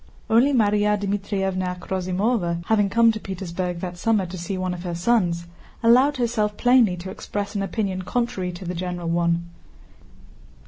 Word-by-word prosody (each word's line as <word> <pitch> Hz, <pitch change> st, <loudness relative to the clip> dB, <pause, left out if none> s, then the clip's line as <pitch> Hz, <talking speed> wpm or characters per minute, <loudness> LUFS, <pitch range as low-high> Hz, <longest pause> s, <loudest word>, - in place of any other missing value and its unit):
Only 240 Hz, +6 st, +5 dB
Márya 210 Hz, -4 st, +3 dB
Dmítrievna 195 Hz, -2 st, -2 dB
Akhrosímova, 185 Hz, 0 st, -1 dB
who -, -, +1 dB
had 205 Hz, -2 st, +2 dB
come 230 Hz, +2 st, +5 dB
to 220 Hz, -, -5 dB
Petersburg 180 Hz, -2 st, -4 dB
that 175 Hz, -1 st, -5 dB
summer 215 Hz, -3 st, +2 dB
to 180 Hz, +1 st, -7 dB
see 185 Hz, +2 st, -4 dB
one 185 Hz, -1 st, -2 dB
of 175 Hz, -, -6 dB
her 175 Hz, -1 st, -4 dB
sons, 175 Hz, -3 st, +1 dB, 0.4 s
allowed 255 Hz, +5 st, +5 dB
herself 220 Hz, -4 st, 0 dB
plainly 245 Hz, -7 st, +4 dB
to 185 Hz, +2 st, -7 dB
express 205 Hz, 0 st, -5 dB
an 200 Hz, -, -1 dB
opinion 195 Hz, -1 st, -2 dB
contrary 190 Hz, -3 st, -2 dB
to 180 Hz, +2 st, -8 dB
the 175 Hz, -, -3 dB
general 175 Hz, -1 st, -4 dB
one. 170 Hz, 0 st, +1 dB
190 Hz, 165 wpm, -23 LUFS, 180-220 Hz, 0.4 s, Only